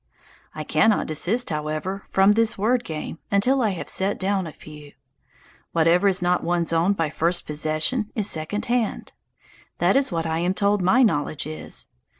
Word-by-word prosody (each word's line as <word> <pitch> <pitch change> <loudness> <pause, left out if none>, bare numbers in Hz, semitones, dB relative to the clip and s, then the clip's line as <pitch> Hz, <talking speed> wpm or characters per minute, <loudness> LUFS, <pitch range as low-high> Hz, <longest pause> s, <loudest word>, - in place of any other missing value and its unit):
I - - -4
cannot 220 -1 +2
desist, 185 +10 -1
however, 155 +6 -3
from 195 +1 +4
this 225 +1 +2
word 235 +5 +1
game 160 -3 -6
until 250 +7 +2
I 220 - +2
have - - -6
set 195 +2 0
down 190 -2 -1
a - - -7
few. 150 -1 -13 0.8
Whatever 170 +4 +3
is 185 -2 +2
not 180 0 +1
one's 170 -1 0
own 170 +5 +3
by 165 -6 -2
first 170 +2 0
possession 155 - -1
is 210 -3 0
second 160 +4 -3
hand. 240 -2 -2 0.6
That - - +2
is 275 -4 +2
what 165 -1 -2
I 160 0 -1
am 180 +2 0
told 200 0 +2
my 210 +9 +4
knowledge 150 - 0
is. 155 +1 -6
180 Hz, 170 wpm, -23 LUFS, 160-210 Hz, 0.8 s, from